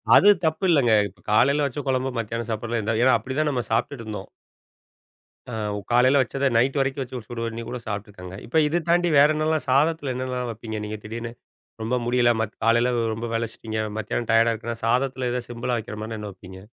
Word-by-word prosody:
அது 205 - +7 0.2
தப்பு 160 +4 0
இல்லங்க. 140 -8 +4 0.2
இப்ப 95 - -18
காலையில 140 +7 +4
வச்ச 140 +1 -3
கொழம்பு, 130 0 +1
மத்தியானம் 115 0 -3
சாப்பிடுறதெல்லாம் 110 0 -1
ஏன்னா, 130 -1 +5
அப்படிதான் 130 +7 -1
நம்ம 125 -3 0
சாப்பிட்டுட்டுருந்தோம். 110 -4 -2 1.2
ஆ - - -3 0.4
காலையில 130 +3 +5
வச்சத 135 +1 -2
நைட் 130 +5 +2
வரைக்கும் 135 0 0
வச்சு 125 0 -7
சுடு 120 -1 -5
பண்ணி 115 0 -4
கூட 125 - -4
சாப்ட்டுக்காங்க. 100 -3 -6
இப்ப 160 +7 +2
இத 170 +4 0
தாண்டி 175 +1 +3
வேற 140 +1 +8
என்னலாம் 155 0 0
சாதத்தில 145 0 +2
என்னலாம் 125 -1 -3
வப்பீங்க 110 0 -6
நீங்க 105 0 -5
திடீர்னு? 115 +2 -5 0.5
ரொம்ப 115 +3 0
முடியல 120 0 +3
மத் 110 -2 -3
காலையில 115 +2 +4 0.2
ரொம்ப 115 +2 -4
வேலச்சிட்டிங்க 115 -1 -3 0.2
மத்தியானம் 115 +2 -3
டயர்டா 115 +1 +5
இருக்குன்னா 115 +1 -5
சாதத்தில 130 +1 +1
ஏதா 125 0 -1
சிம்பிளா 120 +1 -2
வக்கிற 110 -1 -6
மாரினா 110 +1 -5
என்ன 105 -1 -6
வைப்பீங்க? 95 0 -12
120 Hz, 175 wpm, -24 LUFS, 110-135 Hz, 1.2 s, வேற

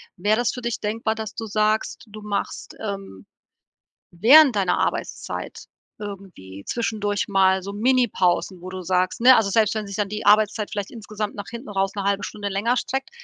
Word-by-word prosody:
Wäre 205 +4 +1
das 240 0 +1
für 250 - -6
dich 235 -1 -3
denkbar, 220 +1 -1
dass 220 -1 -6
du 225 - -5
sagst, 215 +1 0
du 215 0 -11
machst, 205 -1 -4
ähm, 195 - -6 0.9
während 255 - +7
deiner 195 -3 +1
Arbeitszeit - - -3 0.3
irgendwie 190 - -9
zwischendurch 210 -3 -1
mal 190 -1 +3
so 200 +1 -6
Mini-Pausen, 205 -6 +1
wo 185 - -7
du 185 0 -6
sagst 185 +5 0
ne, 255 +2 +8
also 220 -4 +2
selbst 220 +1 +2
wenn 215 -1 -3
sich 200 - -6
dann 205 -1 -1
die 210 +1 -5
Arbeitszeit 210 +1 +3
vielleicht 205 -3 -4
insgesamt 215 -2 -5
nach 205 -1 -7
hinten 235 0 -8
raus 195 0 -1
'ne 200 - -3
1/2 200 +1 0
Stunde 205 -1 -4
länger 215 +6 0
streckt, 265 +2 -3
210 Hz, 180 wpm, -23 LUFS, 195-220 Hz, 0.9 s, ne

